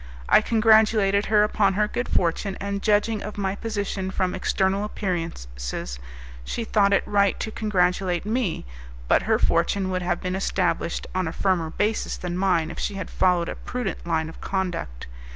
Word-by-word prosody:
I - - +6
congratulated 215 -2 +4
her 210 -1 +4
upon 205 -2 +2
her 210 +1 +2
good 240 +3 -3
fortune, 185 +3 0
and 200 0 -3
judging 210 0 +2
of 210 +1 -7
my 195 -1 -1
position 205 -3 -3
from 185 -1 -1
external 190 +1 0
appearances, 60 - -4 0.4
she 230 - -3
thought 205 -3 +2
it 195 - +3
right 200 -1 +2
to 220 - -3
congratulate 180 -4 0
me, 215 - -1 0.4
but - - +4
her - - +5
fortune 190 -2 +1
would 185 0 -1
have 175 -1 -1
been 180 0 -3
established 185 -3 -1
on 185 -2 0
a - - -2
firmer 180 -4 0
basis 210 +6 -1
than 175 -1 -4
mine 180 -4 +1
if - - -8
she 205 - -2
had 185 -3 -6
followed 180 -2 +2
a - - -3
prudent 220 -9 -5
line 160 -2 0
of 160 - -11
conduct. 180 - -3
195 Hz, 170 wpm, -24 LUFS, 180-210 Hz, 0.4 s, I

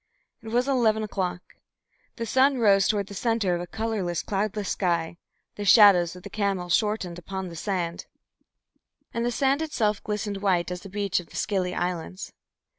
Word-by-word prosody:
It 225 - -12
was 245 +4 +1
eleven 225 -5 +2
o'clock. 185 -4 -3 0.7
The 230 - -4
sun 265 +4 +3
rose 200 -4 +4
toward 205 -2 +1
the 200 - -10
centre 220 -3 0
of 175 - -1
a 175 - -6
colourless, 205 -6 -2
cloudless 205 0 -2
sky, 170 -3 -1 0.4
the 205 - -4
shadows 190 -5 +6
of 180 - -12
the - - -8
camels 195 -5 -1
shortened 200 -4 0
upon 190 +1 -5
the 170 - -9
sand, 175 -1 -3 1.1
and 235 - -1
the 240 - +1
sand 270 +4 +1
itself 220 -10 -1
glistened 210 -1 -3
white 180 -3 +1
as 180 0 -5
a - - -8
beach 200 -1 -1
of 175 - -10
the - - -15
Scilly 185 -3 -1
Islands. 180 +1 -4
200 Hz, 175 wpm, -26 LUFS, 180-220 Hz, 1.1 s, shadows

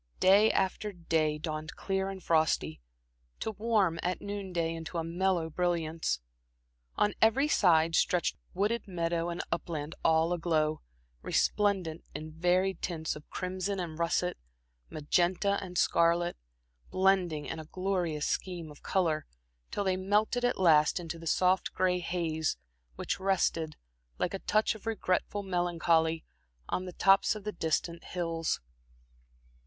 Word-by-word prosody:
Day 200 +4 +6
after 195 +2 0
day 160 -4 0
dawned 155 0 -5
clear 195 0 -1
and 190 -1 -7
frosty, 155 - +1 0.6
to 220 - -2
warm 205 -6 +1
at 180 +1 -1
noon 200 -2 -5
day 165 -2 0
into 165 +1 -6
a 165 - 0
mellow 175 0 0
brilliance. 165 - -1 0.7
On 210 - +2
every 245 +6 +4
side 165 - +4
stretched 175 +1 +2 0.2
wooded 210 +5 0
meadow 170 -2 -1
and 170 - -3
upland 155 -2 -3
all 160 +1 +3
aglow, 160 -3 0 0.4
resplendent 190 -6 +1
in 155 +1 -6
varied 180 +3 +1
tints 160 -3 -2
of 150 - -12
crimson 185 +1 -3
and 165 -3 -5
russet, 175 +1 0 0.5
magenta 180 +6 +1
and 180 -2 -6
scarlet, 170 +1 +3 0.5
blending 185 -5 +2
in 160 - -5
a 155 - -7
glorious 180 -3 -1
scheme 175 -4 -3
of 145 - -15
color, 160 -5 0 0.4
till 205 - -2
they 190 -1 +1
melted 210 +6 +1
at 245 - +1
last 160 -2 +5
into 165 -1 -6
the 165 - -8
soft 185 +3 +2
gray 180 -1 +1
haze, 165 - -1 0.4
which - - -3
rested, 175 -5 0 0.4
like 180 - -1
a 195 - -3
touch 215 +4 +2
of 220 0 -11
regretful 205 -1 -1
melancholy, 170 -3 +1 0.4
on 185 - -2
the 180 - -7
tops 195 +4 +4
of 210 - -8
the 210 - -3
distant 170 -1 -2
hills. 165 -2 -2
175 Hz, 140 wpm, -30 LUFS, 160-190 Hz, 0.7 s, Day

